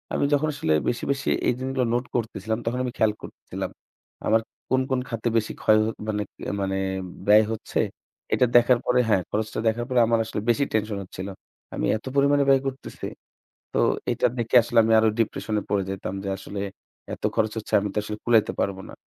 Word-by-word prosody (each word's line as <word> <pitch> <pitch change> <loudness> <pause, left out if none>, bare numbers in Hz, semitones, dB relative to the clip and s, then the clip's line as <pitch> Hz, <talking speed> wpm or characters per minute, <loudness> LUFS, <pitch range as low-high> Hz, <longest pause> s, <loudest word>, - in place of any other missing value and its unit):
আমি - - +2
যখন 145 +2 +3
আসলে 80 - 0 0.2
বেশি, 120 - -3
বেশি, 135 -1 -1 0.2
এই - - +4
জিনিসগুলো 130 -1 -1
নোট 120 +1 0
করতেছিলাম 110 -2 -2
তখন 120 +2 -1
আমি 125 - -2
খেয়াল 110 -1 +3
কর - - -7 0.2
ছিলাম। - - -4 0.6
আমার 110 +1 +4 0.3
কোন, 130 +1 +3
কোন, 130 -1 +1
খাতে 115 0 -3
বেশি 110 - 0
ক্ষয় 110 0 +5 0.3
মানে 105 -1 -1 0.4
মানে, 95 0 -1 0.5
ব্যয় 105 +1 +7
হচ্ছে 110 - -3 0.5
এটা 125 - +4
দেখার 120 0 +6
পরে 125 0 +3
হ্যাঁ 100 -3 +4
খরচটা 110 +1 -2
দেখার 115 +2 +1
পরে 125 -1 +3
আমার 115 0 +3
আসলে 110 - -4
বেশি 130 +4 +3
টেনশন 110 -1 0
হচ্ছিল। 95 +1 -7 0.5
আমি - - -1
এত 110 - -16
পরিমাণে 140 0 +4
ব্যয় 135 -1 +5
করতেছি। 135 0 -6 0.7
তো - - +1 0.3
এটা - - +2
দেখে 120 +1 -1
আসলে 120 +1 -2
আমি 110 - +1
আরো 110 - +4
ডিপ্রেশন 110 -1 -1
এ - - -6
পড়ে 100 -1 +1
যেতাম 95 -1 -4
যে 100 - -3
আসলে 100 +1 -7 0.5
এত - - -9
খরচ 110 -1 +2
হচ্ছে 110 - -6
আমি 100 - -2
তো - - -6
আসলে 105 0 -5
কুলাইতে 115 -3 +4
পারব 100 -1 0
না। - - -10
110 Hz, 195 wpm, -25 LUFS, 105-125 Hz, 0.7 s, ব্যয়